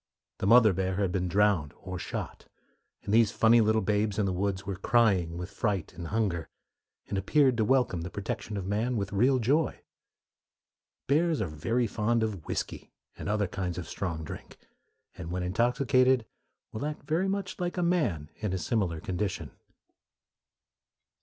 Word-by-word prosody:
The 95 Hz, -, -1 dB
mother 115 Hz, -2 st, +7 dB
bear 95 Hz, 0 st, -1 dB
had 95 Hz, -2 st, 0 dB
been 90 Hz, 0 st, -1 dB
drowned 95 Hz, -6 st, +2 dB
or 95 Hz, -1 st, -6 dB
shot, -, -, -6 dB, 0.6 s
and 100 Hz, -, -2 dB
these 115 Hz, -1 st, +5 dB
funny 115 Hz, +3 st, +5 dB
little 110 Hz, 0 st, +2 dB
"babes 105 Hz, 0 st, 0 dB
in 105 Hz, -, +2 dB
the 95 Hz, -, 0 dB
woods" 95 Hz, +1 st, -2 dB
were 100 Hz, -1 st, -3 dB
crying 95 Hz, -6 st, +2 dB
with 90 Hz, +1 st, -6 dB
fright 100 Hz, -7 st, -2 dB
and 85 Hz, -1 st, -7 dB
hunger, 100 Hz, -6 st, -1 dB, 0.6 s
and 100 Hz, -, -1 dB
appeared 130 Hz, +6 st, +3 dB
to 110 Hz, -, +2 dB
welcome 125 Hz, -8 st, +2 dB
the 85 Hz, -, -5 dB
protection 100 Hz, +2 st, -4 dB
of 95 Hz, -, -4 dB
man 110 Hz, +5 st, 0 dB
with 100 Hz, -1 st, -3 dB
real 125 Hz, +7 st, +4 dB
joy. 135 Hz, +6 st, +1 dB, 1.2 s
Bears 160 Hz, +3 st, +2 dB
are 105 Hz, -, 0 dB
very 115 Hz, +11 st, -1 dB
fond 115 Hz, +1 st, 0 dB
of 100 Hz, -7 st, -4 dB
whiskey -, -, -4 dB, 0.2 s
and -, -, -5 dB
other 105 Hz, -1 st, +1 dB
kinds 90 Hz, -2 st, -4 dB
of 90 Hz, -3 st, -5 dB
strong 85 Hz, -2 st, -4 dB
drink, 75 Hz, -, -9 dB, 0.6 s
and 80 Hz, -, -7 dB
when 90 Hz, +1 st, -2 dB
intoxicated 125 Hz, +5 st, +2 dB, 0.5 s
will 110 Hz, -, -5 dB
act 150 Hz, 0 st, -4 dB
very 170 Hz, +5 st, 0 dB
much 195 Hz, -1 st, -3 dB
like 175 Hz, 0 st, -2 dB
a 180 Hz, -, +1 dB
man 120 Hz, -, 0 dB
in 105 Hz, -4 st, -3 dB
a -, -, 0 dB
similar 90 Hz, -5 st, -1 dB
condition. 95 Hz, +3 st, -3 dB
105 Hz, 165 wpm, -29 LUFS, 90-120 Hz, 1.2 s, mother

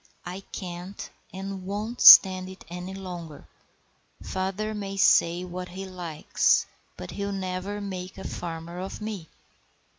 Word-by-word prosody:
I 180 Hz, +2 st, -5 dB
can't 180 Hz, +1 st, -7 dB, 0.2 s
and 195 Hz, 0 st, -6 dB
won't 210 Hz, +5 st, -4 dB
stand 185 Hz, -1 st, +9 dB
it 190 Hz, -, -12 dB
any 180 Hz, +2 st, -6 dB
longer. 175 Hz, -5 st, -8 dB, 0.8 s
Father 190 Hz, +3 st, -3 dB
may 200 Hz, -2 st, -5 dB
say 175 Hz, -2 st, +4 dB
what 180 Hz, 0 st, -6 dB
he 190 Hz, +2 st, -7 dB
likes, 175 Hz, -5 st, +1 dB, 0.3 s
but 90 Hz, -, -7 dB
he'll 200 Hz, 0 st, -3 dB
never 190 Hz, +1 st, -4 dB
make 190 Hz, -2 st, -6 dB
a 190 Hz, -, -6 dB
farmer 170 Hz, 0 st, -6 dB
of 190 Hz, +1 st, -6 dB
me." 210 Hz, -7 st, -6 dB
185 Hz, 130 wpm, -26 LUFS, 180-195 Hz, 0.8 s, stand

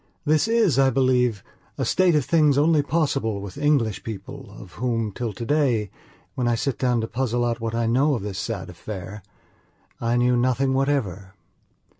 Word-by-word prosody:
This 155 Hz, +5 st, +2 dB
is, 220 Hz, -, +2 dB
I 135 Hz, -1 st, +5 dB
believe, 125 Hz, -4 st, +1 dB, 0.3 s
a -, -, -1 dB
state 185 Hz, -3 st, +3 dB
of 145 Hz, -4 st, +1 dB
things 150 Hz, -4 st, +3 dB
only 155 Hz, +1 st, +4 dB
possible 140 Hz, -9 st, -1 dB
with 100 Hz, -2 st, -8 dB
English 140 Hz, -9 st, +1 dB
people 115 Hz, +4 st, -8 dB
of 95 Hz, -, -12 dB
whom, 115 Hz, -4 st, -1 dB
till 115 Hz, +2 st, -4 dB
today, 115 Hz, -2 st, 0 dB, 0.4 s
when 125 Hz, -2 st, -1 dB
I 120 Hz, -, +2 dB
sit 135 Hz, +3 st, -2 dB
down 125 Hz, -3 st, +1 dB
to 110 Hz, -, -3 dB
puzzle 120 Hz, 0 st, -1 dB
out 120 Hz, 0 st, -1 dB
what 115 Hz, 0 st, -3 dB
I 115 Hz, 0 st, 0 dB
know 135 Hz, +6 st, +2 dB
of 110 Hz, -, -5 dB
this 100 Hz, -2 st, -5 dB
sad 95 Hz, -2 st, -4 dB
affair, 95 Hz, +2 st, -8 dB, 0.8 s
I 120 Hz, +1 st, 0 dB
knew 125 Hz, 0 st, +3 dB
nothing 130 Hz, +2 st, +1 dB
whatever. 105 Hz, -9 st, -1 dB
120 Hz, 175 wpm, -23 LUFS, 110-140 Hz, 0.8 s, I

